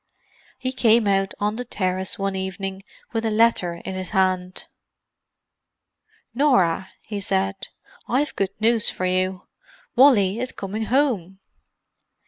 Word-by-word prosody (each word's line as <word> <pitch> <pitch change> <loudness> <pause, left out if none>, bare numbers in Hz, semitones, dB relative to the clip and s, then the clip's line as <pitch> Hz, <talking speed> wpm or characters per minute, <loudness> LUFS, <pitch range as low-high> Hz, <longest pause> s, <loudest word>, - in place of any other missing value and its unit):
He 255 0 -3
came 230 -3 +3
out 195 0 +1
on 210 +2 -1
the 250 - -3
terrace 185 -5 -2
one 195 -1 -2
evening 190 0 -4 0.3
with 225 -1 -1
a 225 - +1
letter 215 -6 +2
in 190 - -4
his 185 -1 -5
hand. 185 -2 0 1.7
"Norah," 230 - +2 0.2
he 210 -2 -4
said. 195 0 -1 0.4
"I've 275 +4 0
good 195 0 -2
news 225 0 +2
for 185 - -3
you—Wally 195 - +1
is 255 +1 -3
coming 205 +3 -4
home." 220 - 0
195 Hz, 120 wpm, -23 LUFS, 190-230 Hz, 1.7 s, came